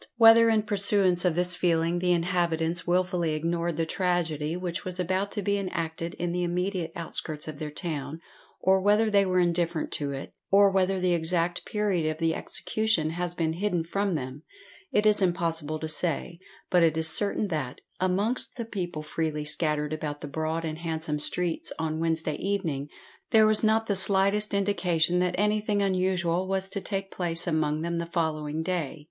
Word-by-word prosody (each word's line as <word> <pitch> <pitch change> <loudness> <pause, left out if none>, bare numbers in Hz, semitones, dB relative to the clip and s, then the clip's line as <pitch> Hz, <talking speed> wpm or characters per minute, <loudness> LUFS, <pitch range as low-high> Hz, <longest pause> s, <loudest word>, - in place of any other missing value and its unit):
Whether 230 0 +7
in 220 -1 +2
pursuance 200 -3 +3
of 175 -3 +2
this 180 +1 +2
feeling 170 -1 +1
the 180 0 +1
inhabitants 170 -1 0
wilfully 180 -2 +1
ignored 170 +1 -2
the 165 - 0
tragedy 165 -3 -1
which 180 -1 -4
was 185 0 -5
about 185 +3 0
to 205 - -3
be 200 +1 +1
enacted 165 -3 -4
in 175 0 -3
the 180 +1 -1
immediate 180 0 -2
outskirts 155 -2 -3
of 155 -2 -7
their 155 - -4
town, 150 -1 -4 0.4
or 190 0 +3
whether 210 +2 +3
they 200 -1 +4
were 185 0 +2
indifferent 170 -2 0
to 145 -1 -3
it, 135 0 -7 0.2
or 200 0 +5
whether 190 0 +1
the 180 -1 +1
exact 170 +1 0
period 200 -6 0
of 155 - -3
the 165 0 +1
execution 210 -4 -1
has 175 +1 -2
been 160 -2 0
hidden 180 -1 -1
from 195 +2 -1
them, 130 0 -5 0.5
it 210 - +2
is 210 -1 +5
impossible 165 -4 0
to 160 - -5
say; 170 +1 -2 0.3
but 180 - +4
it 160 -1 +3
is 160 0 +1
certain 205 +3 +2
that, 145 -7 -3 0.2
amongst 195 +7 +1
the 235 - -3
people 175 -8 -5
freely 155 -1 -3
scattered 150 -1 0
about 150 -1 -4
the - - -6
broad 160 +3 -2
and 155 0 -4
handsome 160 -2 -3
streets 170 +2 +1
on 160 -1 -2
Wednesday 160 -2 0
evening, 165 -8 -2 0.4
there 220 -2 +6
was 215 0 +3
not 220 +1 +3
the 205 - 0
slightest 200 +2 +3
indication 180 -4 +1
that 180 0 0
anything 210 0 +1
unusual 185 -2 0
was 190 0 -1
to 200 0 -4
take 195 -1 -4
place 170 -2 -3
among 155 -2 0
them 170 0 -2
the 170 - -4
following 160 -2 -2
day. 165 -4 -3
175 Hz, 180 wpm, -27 LUFS, 160-190 Hz, 0.5 s, Whether